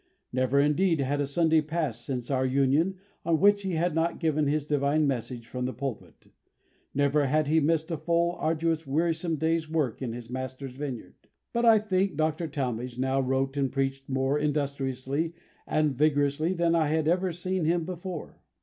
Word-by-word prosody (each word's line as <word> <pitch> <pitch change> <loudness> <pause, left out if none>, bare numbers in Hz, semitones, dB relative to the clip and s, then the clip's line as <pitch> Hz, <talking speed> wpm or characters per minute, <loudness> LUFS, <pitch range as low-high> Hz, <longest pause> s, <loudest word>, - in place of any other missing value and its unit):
Never, 130 +2 +2
indeed, 160 +4 +3
had 140 +1 0
a 140 - -1
Sunday 160 +2 +3
passed, 155 -7 -2
since 125 -1 -4
our 130 -1 +1
union, 140 +7 +2 0.3
on 165 -1 +2
which 205 +1 +5
he 190 -2 -3
had 170 +1 +1
not 165 +1 0
given 155 -3 +1
his 145 0 0
divine 145 +1 +2
message 125 -3 -3
from 125 0 -4
the 130 - -2
pulpit; 135 -4 -7 0.6
never 145 0 +2
had 155 +2 +2
he 160 +2 +4
missed 160 +2 +1
a 165 - -1
full, 170 +2 +1
arduous, 160 0 0
wearisome 165 +3 0
day's 160 0 0
work 150 -8 -1
in 125 -3 -2
his 120 -1 -8
Master's 130 +1 -5
vineyard. 130 -3 -6 0.4
But 235 0 +1
I 225 -1 +7
think 195 -5 0
Dr. 155 +1 0
Talmage 125 -4 -3
now 130 +1 +1
wrote 135 +1 0
and 135 -2 +1
preached 135 0 -2
more 135 +2 +1
industriously 140 +1 -1 0.3
and 155 -3 +1
vigorously 145 +3 +2
than 170 -1 +2
I 165 -2 +3
had 155 0 +1
ever 180 +2 +2
seen 180 0 -2
him 170 0 +1
before. 180 -1 -7
150 Hz, 175 wpm, -28 LUFS, 135-165 Hz, 0.6 s, I